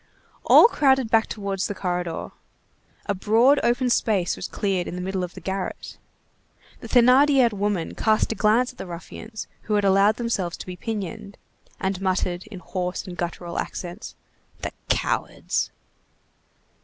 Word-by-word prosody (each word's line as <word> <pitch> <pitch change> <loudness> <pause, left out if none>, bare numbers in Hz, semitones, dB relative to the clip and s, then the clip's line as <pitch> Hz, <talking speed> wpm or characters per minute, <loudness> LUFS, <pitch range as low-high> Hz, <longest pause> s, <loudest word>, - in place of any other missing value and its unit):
All - - +8
crowded 265 - +2
back 225 -1 +4
towards 200 -2 -3
the 205 - -4
corridor. 180 -3 -3 0.7
A - - 0
broad 230 +8 +4
open 245 +1 +1
space 200 -7 +1
was 185 - -5
cleared 190 -3 -1
in - - -5
the 180 - -4
middle 190 0 -2
of 180 - -6
the - - -7
garret. 190 +2 -5 0.8
The - - -9
Thénardier 255 0 +5
woman 200 -4 -1
cast 215 0 +1
a - - +1
glance 225 +4 +3
at 250 - -24
the - - -6
ruffians 215 +5 -8 0.2
who 210 - +2
had 205 -1 +2
allowed 195 +2 +4
themselves 205 -8 -2
to - - -8
be 180 - -7
pinioned, 205 0 -5 0.4
and 190 -1 -2
muttered 185 -1 -1
in 180 - -9
hoarse 180 -1 -3
and 180 - -7
guttural 175 0 -4
accents:— 180 +5 -6 0.5
"The - - -2 0.2
cowards!" - - -1
200 Hz, 155 wpm, -24 LUFS, 180-225 Hz, 0.8 s, All